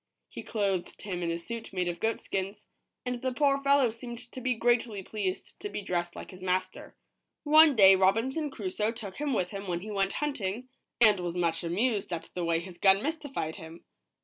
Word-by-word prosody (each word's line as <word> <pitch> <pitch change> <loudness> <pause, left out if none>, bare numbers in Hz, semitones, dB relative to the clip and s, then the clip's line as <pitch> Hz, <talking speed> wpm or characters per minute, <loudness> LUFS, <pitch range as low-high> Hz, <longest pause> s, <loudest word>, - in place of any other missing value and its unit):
He - - -7
clothed 195 -5 -2
him 185 -4 -4
in 170 - -1
a 170 - -1
suit 225 +5 -7
made 180 -1 0
of 175 -1 -3
goatskins, 205 -2 -2 0.4
and 250 -1 -3
the 260 -1 0
poor 275 +1 +2
fellow 275 -3 +4
seemed 235 +1 -8
to 255 - -7
be 250 0 +1
greatly 230 -3 +1
pleased 195 -2 -4
to 410 - -5
be 210 - -5
dressed 175 -2 -2
like - - -8
his 185 -1 -12
master. 185 0 -2 0.5
One 310 -1 +7
day 195 -3 +8
Robinson 230 +11 +2
Crusoe 210 -2 -2
took 205 -5 -8
him 295 -1 -1
with 180 -8 0
him 200 -1 -6
when 175 -1 -2
he 215 +2 -7
went 195 -1 0
hunting, 250 -5 -3 0.3
and 215 -4 +6
was 175 0 -3
much 165 -1 0
amused 200 +4 0
at 170 -2 -5
the 180 - -3
way 165 -1 +1
his 180 0 -10
gun 195 +2 +5
mystified 285 - -3
him. 165 -1 -11
205 Hz, 200 wpm, -29 LUFS, 185-245 Hz, 0.5 s, day